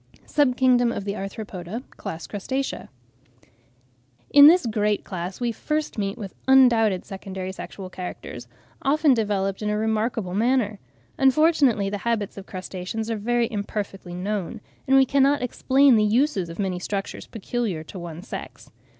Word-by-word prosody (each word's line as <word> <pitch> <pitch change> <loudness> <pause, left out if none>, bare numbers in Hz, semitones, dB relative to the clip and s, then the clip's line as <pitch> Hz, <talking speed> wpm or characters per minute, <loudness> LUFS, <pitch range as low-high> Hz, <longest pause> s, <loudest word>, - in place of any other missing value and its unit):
SUB 270 -4 +2
KINGDOM 245 -2 +4
OF 200 - -4
THE 200 0 -2
ARTHROPODA: 195 +1 -6
CLASS, 160 0 -7
CRUSTACEA. 260 +7 -4 1.4
In 285 0 +10
this 345 -2 +6
great 210 -2 0
class 185 0 -5
we 240 -1 0
first 300 +1 -3
meet 195 -1 -2
with 200 -5 -7
undoubted 235 -7 +5
secondary 190 -1 -6
sexual 190 0 -8
characters, 180 -1 -7 0.3
often 290 +1 +3
developed 200 -4 -1
in 210 - -1
a 210 - 0
remarkable 220 -3 -1
manner. 220 -1 +1 0.4
Unfortunately 270 -6 +4
the 205 +1 -3
habits 225 -3 -1
of 195 -1 -10
crustaceans 190 +4 -5
are - - 0
very 235 +2 0
imperfectly 200 -3 -5
known, 205 +3 -3 0.3
and 270 +1 +5
we 265 - +6
cannot 280 +1 +3
explain 265 +2 +4
the 215 - +4
uses 210 - +1
of 165 - -8
many 190 -3 -2
structures 195 +2 -4
peculiar 225 -6 -3
to 185 +4 -9
one 170 0 -8
sex. - - -8
215 Hz, 150 wpm, -24 LUFS, 195-250 Hz, 1.4 s, In